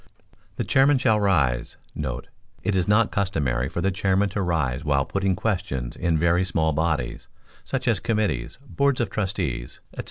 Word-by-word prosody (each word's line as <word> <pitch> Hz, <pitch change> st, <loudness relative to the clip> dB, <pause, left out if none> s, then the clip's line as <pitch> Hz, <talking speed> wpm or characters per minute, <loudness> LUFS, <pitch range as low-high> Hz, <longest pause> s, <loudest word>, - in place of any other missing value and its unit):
The -, -, -2 dB
chairman 135 Hz, +1 st, +4 dB
shall 110 Hz, -5 st, +3 dB
rise* 70 Hz, -12 st, +1 dB, 0.2 s
[It 75 Hz, +8 st, -5 dB
is 90 Hz, -2 st, +1 dB
not 105 Hz, +2 st, +3 dB
customary 70 Hz, -, 0 dB
for 85 Hz, -, -3 dB
the 95 Hz, -, +1 dB
chairman 95 Hz, +1 st, +1 dB
to 100 Hz, +2 st, -2 dB
rise 75 Hz, -7 st, 0 dB
while 70 Hz, -3 st, +1 dB
putting 100 Hz, +1 st, 0 dB
questions 90 Hz, -, -2 dB
in 85 Hz, -2 st, +1 dB
very 85 Hz, +3 st, +3 dB
small 80 Hz, -4 st, +1 dB
bodies, 75 Hz, -6 st, -1 dB, 0.4 s
such -, -, -3 dB
as -, -, +3 dB
committees, 110 Hz, -, -1 dB
boards 140 Hz, -2 st, +1 dB
of 115 Hz, -6 st, -1 dB
trustees, 90 Hz, -, -3 dB, 0.2 s
&c. -, -, -10 dB
90 Hz, 160 wpm, -24 LUFS, 70-100 Hz, 0.4 s, chairman